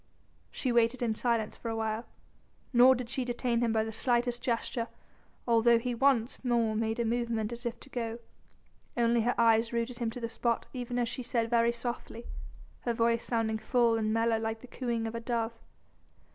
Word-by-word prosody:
She 255 - -2
waited 235 +1 +2
in 225 -2 +1
silence 230 -1 0
for 230 - -6
a 225 - -2
while, 220 +1 -2 0.7
nor 250 +2 +7
did 250 -1 -5
she 260 +1 -2
detain 240 -1 -1
him 235 -1 +2
by 220 -1 +2
the 220 - -4
slightest 240 +1 +1
gesture 235 -1 -1 0.6
although 235 0 +5
he 245 +1 -2
once 250 -1 +2
more 235 -3 +2
made 225 +1 -1
a 235 - +1
movement 230 -1 -1
as 240 +1 -5
if 235 0 -5
to 275 - -12
go, 230 -2 -3 0.8
only 235 0 +3
her 240 +2 +1
eyes 230 0 +4
rooted 235 0 -2
him 235 -2 0
to 230 - -7
the 230 - -2
spot 235 0 -1
even 245 -1 -4
as 240 -1 +1
she 255 - -4
said 235 -1 -1
very 235 0 +4
softly, 235 0 -5 0.5
her 235 -1 -2
voice 230 0 +2
sounding 225 -2 0
full 235 -1 +2
and 215 -1 0
mellow 225 0 +2
like 225 0 -3
the 255 - -11
cooing 235 -2 -2
of 225 - -4
a 230 - -3
dove. 230 -1 -1
235 Hz, 195 wpm, -30 LUFS, 225-240 Hz, 0.8 s, nor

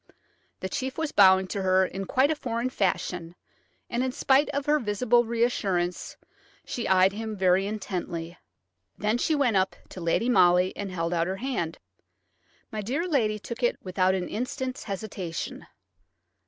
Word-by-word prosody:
The 190 - -2
chief 265 +4 -3
was 320 -2 -1
bowing 190 -1 +6
to 200 - -2
her 190 0 +3
in 195 +1 -5
quite 265 +9 +2
a - - +1
foreign 245 -2 -2
fashion, 180 -5 -1 0.5
and 240 +1 -1
in 260 - -1
spite 275 +1 +3
of 280 -1 -2
her 300 +1 +3
visible 240 +2 +2
reassurance 200 -7 -1 0.5
she 240 - -3
eyed 190 0 +4
him 220 0 -5
very 190 +1 +3
intently. 180 -5 -5 0.6
Then 215 +3 0
she 315 - +1
went 250 -8 +2
up 190 0 +1
to 185 - -9
Lady 170 +8 +1
Molly 180 -5 +4
and 200 -1 -4
held 170 -1 -2
out 170 0 +1
her 190 - -2
hand. 215 -10 -3 0.9
My 215 -1 -3
dear 275 - -2
lady 225 -10 +1
took 235 +3 -7
it 240 - +2
without 185 0 +1
an 180 -2 -2
instant's 255 +3 -4
hesitation. 195 -4 -5
205 Hz, 160 wpm, -27 LUFS, 185-250 Hz, 0.9 s, bowing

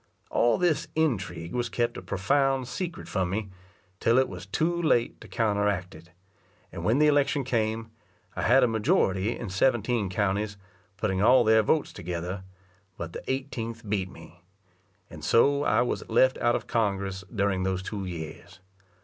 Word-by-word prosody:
All 120 - +3
this 175 -4 +1
intrigue 100 - -1
was 120 -1 -1
kept 120 -1 -1
a - - -6
profound 135 +8 +1
secret 165 +7 -5
from 95 -3 -1
me, 100 +1 -3 0.5
till 115 +2 +3
it 130 - +4
was 90 0 -9
too 170 - 0
late 120 -8 +1
to - - -11
counteract 100 -4 0
it; 85 +2 -14 0.6
and - - -7
when 115 +4 +3
the 150 - +5
election 145 -1 +3
came, 115 -2 -1 0.4
I - - -3
had 130 +4 +5
a - - +5
majority 105 -2 +1
in 110 -5 -6
seventeen 115 0 +1
counties, 100 +2 -1 0.4
putting 95 -1 0
all 125 +4 +6
their 110 0 +5
votes 150 +8 +1
together, 90 +2 -5 0.5
but 85 0 -6
the - - -6
eighteenth 115 -4 -4
beat 100 -2 -1
me; 90 -1 -14 0.7
and - - -11
so 140 +4 +4
I 120 - +3
was 125 - -3
left 130 +3 +3
out 120 0 +2
of - - -3
Congress 100 -3 -1
during 100 -4 0
those 95 0 -1
two 100 0 -4
years. 85 0 -8
110 Hz, 165 wpm, -27 LUFS, 95-125 Hz, 0.7 s, all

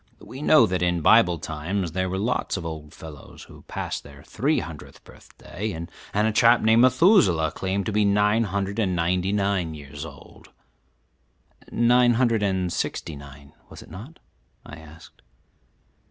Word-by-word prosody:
We 135 - -11
know 150 -4 +5
that 90 -4 -2
in 90 -1 0
Bible 90 -1 +4
times 80 +4 -4
there 95 +2 -2
were 95 - -3
lots 110 0 -2
of 85 - -7
old 80 -2 -7
fellows 75 -3 -12
who - - -15
passed - - -5
their 70 0 -14
three 145 +8 -1
hundredth 80 -4 -8
birthday, 105 +3 -8
and 85 +1 -7 0.3
a 105 +2 +2
chap 115 +2 +4
named 110 +1 +4
Methuselah 125 - +4
claimed 95 +1 -3
to - - -2
be 105 0 +1
nine 105 +2 +2
hundred 100 +1 -3
and 95 -5 0
ninety 90 +3 0
nine 100 -5 -1
years 70 0 -9
old." 75 -3 -13 1.2
"Nine 120 0 +3
hundred 115 -3 +1
and 95 -3 -1
sixty 80 -2 -4
nine, 70 0 -14 0.2
was - - -12
it - - -18
not?" 120 - -11 0.5
I 75 - -10
asked. 80 0 -16
95 Hz, 160 wpm, -24 LUFS, 80-110 Hz, 1.2 s, know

